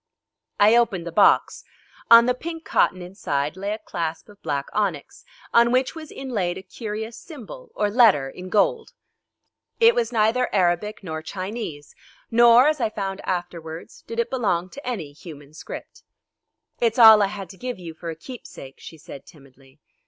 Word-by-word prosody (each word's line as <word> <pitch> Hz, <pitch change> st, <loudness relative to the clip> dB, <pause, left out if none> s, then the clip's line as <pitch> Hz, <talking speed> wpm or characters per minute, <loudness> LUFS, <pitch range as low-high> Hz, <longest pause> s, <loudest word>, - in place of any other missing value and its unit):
I 210 Hz, +3 st, +6 dB
opened 220 Hz, -8 st, +1 dB
the 170 Hz, -, -5 dB
box. 200 Hz, +4 st, +3 dB, 0.5 s
On 235 Hz, 0 st, +9 dB
the 250 Hz, -, +2 dB
pink 325 Hz, +5 st, -7 dB
cotton 185 Hz, 0 st, +1 dB
inside 150 Hz, -6 st, -3 dB
lay 200 Hz, +2 st, -4 dB
a 215 Hz, -, -2 dB
clasp 170 Hz, -5 st, -5 dB
of 205 Hz, -1 st, -18 dB
black 140 Hz, -1 st, -2 dB
onyx, 190 Hz, -9 st, -3 dB, 0.3 s
on 235 Hz, 0 st, +5 dB
which 255 Hz, +1 st, +1 dB
was 315 Hz, -2 st, -10 dB
inlaid 210 Hz, -10 st, -3 dB
a 190 Hz, -, -9 dB
curious 220 Hz, +3 st, -6 dB
symbol 335 Hz, -, -11 dB
or 210 Hz, -, +1 dB
letter 210 Hz, -, +4 dB
in 180 Hz, +7 st, -9 dB
gold. 220 Hz, -, +1 dB, 0.9 s
It 460 Hz, 0 st, +6 dB
was 480 Hz, -1 st, -1 dB
neither 230 Hz, +2 st, +1 dB
Arabic 190 Hz, +3 st, 0 dB
nor 160 Hz, -3 st, -5 dB
Chinese, 185 Hz, -3 st, -6 dB, 0.4 s
nor, 235 Hz, +3 st, +6 dB
as 305 Hz, -3 st, 0 dB
I 225 Hz, -, +1 dB
found 195 Hz, -2 st, -5 dB
afterwards, 170 Hz, -3 st, -5 dB
did 230 Hz, 0 st, -5 dB
it 235 Hz, -, -1 dB
belong 185 Hz, -8 st, -1 dB
to 285 Hz, -2 st, -10 dB
any 190 Hz, -13 st, -4 dB
human 145 Hz, -1 st, -13 dB
script. -, -, -10 dB, 0.8 s
"It's 230 Hz, 0 st, +1 dB
all 220 Hz, -3 st, +9 dB
I 200 Hz, -, +3 dB
had 200 Hz, -1 st, -7 dB
to 190 Hz, -, -15 dB
give 250 Hz, +2 st, -5 dB
you 170 Hz, -3 st, -9 dB
for 165 Hz, +1 st, -8 dB
a 165 Hz, -, -5 dB
keepsake," 160 Hz, -, -11 dB
she 160 Hz, -, -11 dB
said 140 Hz, -2 st, -12 dB
timidly. 135 Hz, -2 st, -20 dB
205 Hz, 170 wpm, -23 LUFS, 170-235 Hz, 0.9 s, On